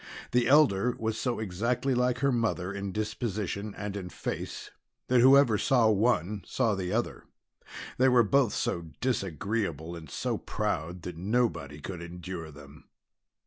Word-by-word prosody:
The 120 -1 +3
elder 125 -5 +4
was 110 0 -2
so 120 +2 -1
exactly 115 +6 -1
like 125 0 +1
her 140 - +4
mother 115 -6 -1
in 100 -1 -4
disposition 105 -1 -3
and 105 0 -5
in 95 -3 -5
face - - -5 0.4
that 125 -1 +5
whoever 130 -4 +6
saw 120 -4 +4
one, 105 -2 +1
saw 115 -5 0
the 95 -2 -3
other. - - -2 0.7
They 130 +1 +6
were 125 -2 +5
both 125 +1 +3
so 85 -2 -2
disagreeable 95 - -2
and 80 -3 -10
so - - -2
proud 90 -4 -3
that 90 -2 -6
nobody 95 - -1
could 90 +2 -6
endure 85 -1 -7
them. 70 -1 -14
105 Hz, 145 wpm, -29 LUFS, 90-120 Hz, 0.7 s, whoever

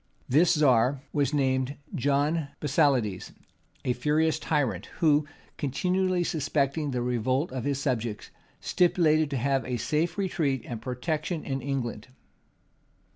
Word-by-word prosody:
This 165 +7 +4
czar 130 -2 +3
was 145 -1 +1
named 130 -1 0 0.2
John 145 +3 +1
Basilides, 135 - +1 0.5
a 125 - +2
furious 155 +5 +1
tyrant, 135 - -1
who, 150 -2 +3 0.3
continually 180 +6 0
suspecting 150 -1 0
the 125 -2 -1
revolt 125 +5 0
of 130 -2 -4
his 140 -1 0
subjects, 120 -6 -2 0.3
stipulated 155 -4 +2
to 140 - -2
have 135 +1 +1
a 125 0 -3
safe 160 - -1
retreat 155 - 0
and 115 -3 -6
protection 155 +7 -3
in 135 0 -3
England. 125 -5 -3
140 Hz, 125 wpm, -27 LUFS, 125-155 Hz, 0.5 s, This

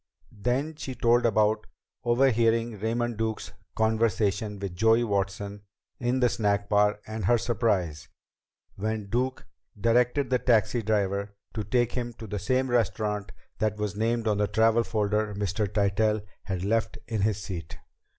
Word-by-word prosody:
Then 125 +9 -1
she 130 -4 -5
told 120 0 +3
about 110 0 +2 0.4
overhearing 115 -3 +2
Raymond 115 +2 -1
Duke's 110 -1 -3 0.2
conversation 110 -2 +1
with 95 -2 -5
Joey 115 +4 +4
Watson 100 -1 -2 0.4
in 125 +2 0
the 125 - +5
snack 100 -3 0
bar 105 0 +3
and 110 -2 -4
her 120 +5 +4
surprise 100 -10 -1 0.7
when 105 0 -3
Duke 130 +2 -1 0.3
directed 125 +5 +2
the 125 - +3
taxi 115 -1 +2
driver 100 -1 -1 0.2
to 110 - -3
take 120 +1 +1
him 120 -1 -3
to 115 - -9
the 105 -1 -4
same 130 +6 0
restaurant 105 -3 0 0.3
that 110 -1 0
was 105 -1 -2
named 115 +1 0
on 105 -1 +1
the 105 - +2
travel 115 +2 +3
folder 105 -1 0
Mr. 100 +1 -1
Tytell 105 +1 +1 0.2
had 95 -2 -3
left 115 +2 0
in 110 -3 -1
his 105 -1 +1
seat. 90 -6 -6
110 Hz, 150 wpm, -27 LUFS, 100-120 Hz, 0.7 s, the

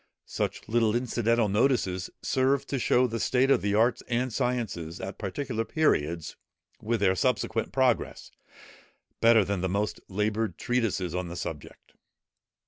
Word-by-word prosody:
Such - - -3
little 115 -1 +2
incidental 120 -2 +1
notices 100 -4 +1
serve 135 +1 +1
to 140 - -2
show 125 +1 +3
the 115 -2 -3
state 130 +4 +2
of - - +4
the 100 0 0
arts 115 +3 +2
and 125 0 -1
sciences 105 -10 -2
at 95 +1 -6
particular 115 +3 -3
periods, 85 - 0 0.5
with 115 0 -1
their 95 -2 +4
subsequent 115 0 0
progress, 130 -4 0 0.9
better 115 -3 +5
than 100 -1 -2
the 95 - -1
most 100 +3 -1
laboured 105 +3 -1
treatises 110 -8 -1
on 90 0 -2
the 85 - -7
subject. 80 -4 -8
110 Hz, 140 wpm, -27 LUFS, 95-125 Hz, 0.9 s, better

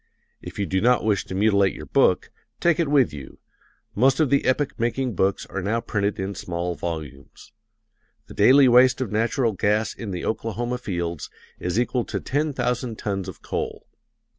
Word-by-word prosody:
If - - -9
you 100 - -1
do 95 0 -1
not 125 +1 +3
wish 105 -3 +1
to 95 - -6
mutilate 100 -1 +3
your - - -8
book, - - +2 0.3
take 170 -2 +2
it 165 - +2
with 140 - +3
you 70 -3 -10 0.6
most 130 +5 +3
of 150 -4 +2
the 140 - +2
epoch 130 +1 0
making 120 +1 -1
books 95 +1 0
are 100 - -5
now 105 +5 0
printed 105 -2 -2
in 95 +1 -3
small 90 -1 -3
volumes. 75 -6 -7 0.7
The - - -12
daily 130 +6 +6
waste 125 +1 +5
of 130 -6 -3
natural 115 +2 +1
gas 105 +2 0
in 115 - -7
the 90 -2 -4
Oklahoma 120 +2 -2
fields 85 -7 -4 0.3
is 90 +5 -1
equal 125 0 0
to - - -3
ten 150 +3 -1
thousand 125 -3 -2
tons 95 -3 -3
of - - -10
coal. - - -4
110 Hz, 180 wpm, -23 LUFS, 95-125 Hz, 0.7 s, daily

